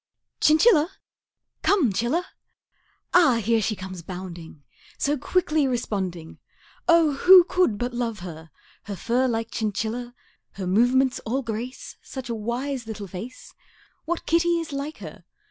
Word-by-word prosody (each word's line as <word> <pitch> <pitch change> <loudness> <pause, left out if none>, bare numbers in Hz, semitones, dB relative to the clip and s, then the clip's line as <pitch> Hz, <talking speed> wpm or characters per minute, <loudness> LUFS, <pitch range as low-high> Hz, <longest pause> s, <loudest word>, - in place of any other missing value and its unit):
Chinchilla? 315 +1 +5 0.7
Come, 310 - +3
'Chilla! 245 - 0 0.9
Ah, 325 -9 +6
here 230 0 +1
she 215 +1 -1
comes 185 -2 -8
bounding, 170 -4 -9 0.3
So 290 +1 +1
quickly 305 0 +1
responding, 190 -9 -3 0.5
Oh, 335 -3 +5
who 365 +3 +9
could 360 - +1
but 245 +3 -3
love 230 -5 -3
her! 160 -2 -9 0.4
Her 205 - -5
fur 245 +6 +1
like 230 -2 -2
chinchilla 225 +4 -3 0.4
Her 195 - -5
movements 245 +7 +3
all 260 +5 -2
grace 230 +3 -6
Such 260 -2 -8
a - - -1
wise 240 +3 -3
little 215 -2 -6
face 195 +7 -9 0.5
What 340 +1 -3
kitty 340 +1 +2
is 320 -3 -6
like 285 +3 -4
her? - - -11
240 Hz, 135 wpm, -24 LUFS, 205-295 Hz, 0.9 s, who